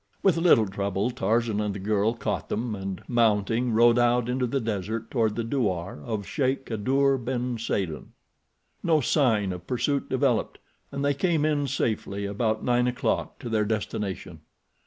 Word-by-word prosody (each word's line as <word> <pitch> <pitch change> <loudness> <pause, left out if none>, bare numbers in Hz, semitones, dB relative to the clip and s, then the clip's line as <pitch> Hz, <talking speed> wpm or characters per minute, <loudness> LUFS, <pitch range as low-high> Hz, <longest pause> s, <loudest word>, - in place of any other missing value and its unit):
With 190 -4 +4
little 165 -10 +5
trouble 100 +3 -1
Tarzan 115 -1 0
and 105 -1 -2
the - - -5
girl 105 +3 +1
caught 105 -5 -3
them, 115 +1 -2
and, 95 -2 -5
mounting, 115 0 +2
rode 120 +2 +5
out 120 0 +2
into 125 0 0
the 135 +3 0
desert 110 0 -3
toward 110 -4 +1
the 115 - -1
douar 95 - -2
of 105 +1 -3
Sheik 135 - -1
Kadour 135 +5 +1
ben 125 -1 -2
Saden. 95 -8 -3 0.7
No 160 -2 +3
sign 115 -9 +2
of 90 0 -9
pursuit 130 +3 -1
developed, - - +1 0.3
and 140 0 -2
they 145 - +3
came 160 +1 +1
in 145 -2 +1
safety 105 -6 -2
about 110 +2 -1
nine 125 0 +2
o'clock 125 - -1
to - - -8
their 110 -2 +1
destination. 105 -5 -3
115 Hz, 160 wpm, -26 LUFS, 105-125 Hz, 0.7 s, little